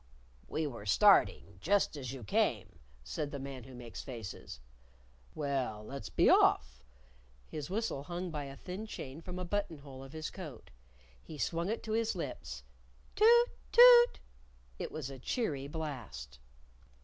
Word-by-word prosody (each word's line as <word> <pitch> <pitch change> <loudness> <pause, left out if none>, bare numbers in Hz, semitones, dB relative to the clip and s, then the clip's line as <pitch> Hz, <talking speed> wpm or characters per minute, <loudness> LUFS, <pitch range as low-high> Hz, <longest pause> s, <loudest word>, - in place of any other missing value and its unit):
"We 160 - -1
were 115 -7 -6
starting 95 0 +4
just 200 -2 +2
as 130 -4 -5
you 135 -3 -7
came," 100 - 0 0.2
said 65 - -3
the 145 - -5
Man 135 -2 -7
Who 130 -1 -11
Makes 120 -2 -8
Faces. 110 - -8 0.8
"Well, 130 -7 -2
let's 140 +4 -7
be - - +3
off!" 60 +1 +4 0.6
His 150 0 -6
whistle 210 -7 -2
hung 175 +1 -4
by 150 -2 -4
a 135 0 -9
thin 190 +8 -6
chain 140 -6 -7
from 180 +2 -7
a 180 - -3
button 190 -3 -2
hole 135 -2 -11
of 135 +2 -12
his 155 -1 -5
coat. 155 - -9 0.5
He 155 - -10
swung 170 +5 -1
it 225 - -2
to 220 - -5
his 225 -1 +1
lips, 65 - -6 0.5
Toot! 475 +3 +6 0.2
Toot! 485 0 +8 0.6
It - - -4
was 145 -4 -5
a 135 - -9
cheery 140 - -2
blast. 135 - -6
145 Hz, 155 wpm, -33 LUFS, 130-180 Hz, 0.8 s, Toot